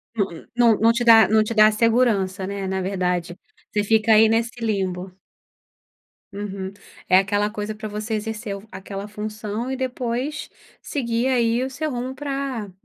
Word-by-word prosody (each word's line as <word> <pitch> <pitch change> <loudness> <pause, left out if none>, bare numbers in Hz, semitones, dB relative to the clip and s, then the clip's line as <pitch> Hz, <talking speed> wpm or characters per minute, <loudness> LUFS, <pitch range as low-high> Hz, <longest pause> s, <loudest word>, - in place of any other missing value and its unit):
Nã 200 -3 +2 0.3
nã 235 -3 +4
não 230 +1 +6
te 235 +1 -1
dá 225 -1 +8
não 220 0 +4
te 230 - -3
dá 215 0 +6
segurança, 215 -4 +1
né, 195 -1 -4
na 190 0 -1
verdade. 180 -2 -2 0.4
Você 210 -1 +1
fica 220 +1 +3
aí 220 +1 +7
nesse 230 +2 0
limbo. 190 -4 -2 1.2
Uhum. 195 -1 -5 0.4
É 185 - +7
aquela 205 +1 0
coisa 210 0 -5
pra 215 0 -6
você 210 +2 -4
exercer 215 -1 -4
fu - - -18
aquela 195 +1 -7
função 215 +2 -5
e 265 - -2
depois 260 +2 -3 0.3
seguir 235 -2 -1
aí 240 -2 +2
o 260 - -2
seu 305 +3 -3
rumo 255 +2 -4
pra 270 -8 -4
215 Hz, 165 wpm, -22 LUFS, 200-235 Hz, 1.2 s, dá